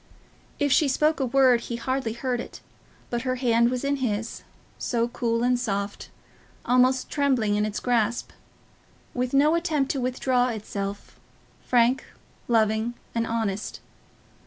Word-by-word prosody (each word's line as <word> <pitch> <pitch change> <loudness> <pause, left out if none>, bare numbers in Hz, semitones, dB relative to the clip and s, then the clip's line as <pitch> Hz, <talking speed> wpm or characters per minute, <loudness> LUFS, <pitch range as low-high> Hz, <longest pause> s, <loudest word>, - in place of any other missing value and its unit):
If 285 -1 +1
she 295 +3 +4
spoke 305 +3 +2
a 265 - 0
word 255 -2 +4
he 235 - -5
hardly 250 -1 -2
heard 245 +1 -2
it, - - -8 0.5
but 240 -1 -1
her 255 0 -1
hand 235 -2 +3
was 250 +1 -2
in 280 0 0
his, 230 -3 -2 0.4
so 235 -1 0
cool 235 -1 -1
and 250 0 +2
soft, 200 -4 -3 0.6
almost 255 +1 +3
trembling 260 -8 +1
in 210 +1 +1
its 210 - -4
grasp, 240 -1 0 0.8
with 250 0 -1
no 290 +3 +4
attempt 315 -5 +1
to 270 - -2
withdraw 250 0 +1
itself, 200 -3 -5 0.4
frank, 245 +1 +2 0.4
loving, 220 0 +1 0.2
and 230 0 -1
honest. 215 -3 -2
245 Hz, 140 wpm, -25 LUFS, 230-260 Hz, 0.8 s, she